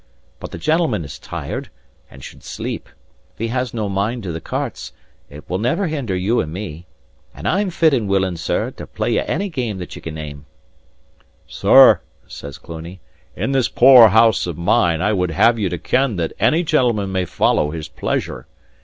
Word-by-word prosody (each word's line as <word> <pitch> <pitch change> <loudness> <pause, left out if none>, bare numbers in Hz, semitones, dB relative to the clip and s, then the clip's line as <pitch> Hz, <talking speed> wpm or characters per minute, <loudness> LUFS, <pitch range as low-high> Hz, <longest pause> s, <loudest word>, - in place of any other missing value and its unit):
But - - -7
the - - -8
gentleman 155 - 0
is 70 - -9
tired, - - -6 0.4
and 65 -1 -14
should - - -11
sleep; - - -6 0.4
if - - -37
he 115 +1 -3
has 125 0 -2
no 110 -3 -3
mind 100 +5 -2
to 90 - -4
the 80 0 -5
cartes, - - -5 0.4
it 75 +1 -12
will 90 +2 -2
never 160 - 0
hinder 140 - -2
you 100 +6 +1
and 75 - -5
me. 90 -2 -7 0.5
And 75 +9 -5
I'm 195 - +1
fit 165 -3 +2
and 115 -6 0
willing, 95 -2 +1
sir, 80 - -2
to - - -10
play - - -2
ye - - +2
any 200 - -2
game 125 - -3
that 90 -1 -7
ye - - -10
can 80 -1 -7
name." 75 -2 -8 1.0
"Sir," - - +6 0.2
says 70 -1 -9
Cluny, 85 +5 -9 0.4
"in - - -2
this 135 -3 +1
poor 125 -2 +8
house 110 -1 +4
of 85 -4 -5
mine 85 0 +2
I 105 +2 +2
would 90 -3 0
have 115 +8 +3
you 100 -3 0
to 90 - -3
ken 130 +4 0
that 85 -2 -2
any 165 +3 +3
gentleman 120 - +1
may 95 -1 0
follow 75 - +1
his 80 0 -6
pleasure. 80 -1 -4
100 Hz, 190 wpm, -19 LUFS, 85-125 Hz, 1.0 s, poor